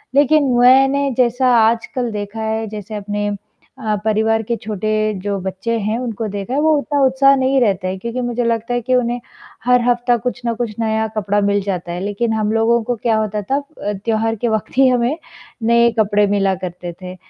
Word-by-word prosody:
लेकिन 290 +2 +4 0.2
मैंने 270 +3 +5
जैसा 250 +1 +2
आजकल 230 +2 +1
देखा 210 +1 -5
है, 220 0 -2
जैसे 210 0 -7
अपने 205 0 -3 0.6
अ, 215 -1 +1
परिवार 220 +1 +2
के 235 +2 -2
छोटे 215 0 -3 0.3
जो 205 -1 -1
बच्चे 190 +5 -3
हैं, 215 +2 -1
उनको 230 -3 -4
देखा 205 +4 -5
है 280 - +1
वो 315 +1 +3
उतना 285 0 -1
उत्साह 275 +1 +4
नहीं 265 +1 +2
रहता 195 -5 +1
है, 185 +1 -3
क्योंकि 235 +5 -4
मुझे 245 0 -1
लगता 230 0 -1
है 245 - 0
कि 255 +2 +1
उन्हें 245 -1 0 0.5
हर 250 0 +4
हफ्ता 245 0 +2
कुछ 245 +1 -4
ना 235 - +1
कुछ 230 -1 -3
नया 220 -1 0
कपड़ा 205 0 +1
मिल 200 0 +1
जाता 180 -3 -3
है, 175 - -4
लेकिन 210 +3 -1
हम 215 -1 0
लोगों 225 +1 +2
को 245 +2 -2
क्या 225 0 0
होता 215 -1 -1
था 275 - +3
अ, 280 -7 -5
त्योहार 225 0 0
के 230 +2 -2
वक़्त 220 +2 -3
ही 270 0 +6
हमें 250 +3 +1 0.5
नए 235 +1 +4
कपड़े 205 -1 +3
मिला 195 -1 +1
करते 175 -1 -6
थे। 185 0 -7
225 Hz, 200 wpm, -18 LUFS, 205-245 Hz, 0.6 s, ही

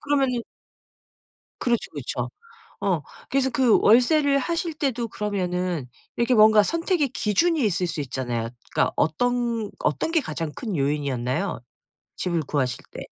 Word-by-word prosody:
그러면은 270 -5 +1 1.2
그렇죠 240 -2 0
그렇죠. - - -4 0.5
어 185 -6 +1 0.3
그래서 270 -1 +2
그 260 -4 +4
월세를 275 +5 +5
하실 335 +3 -2
때도 250 -6 -2
그러면은 180 -8 -2 0.3
이렇게 235 +2 +2
뭔가 215 -2 +7
선택의 335 - 0
기준이 295 - +1
있을 185 -3 +1
수 170 -1 -4
있잖아요. 120 -4 -3 0.2
그러니까 - - +1
어떤 235 +6 0
어떤 150 - 0
게 330 -2 +3
가장 155 - -4
큰 215 -8 -3
요인이었나요? 140 +3 -1 0.6
집을 170 -2 0
구하실 135 -4 -2
때. - - -8
215 Hz, 310 characters per minute, -24 LUFS, 160-265 Hz, 1.2 s, 뭔가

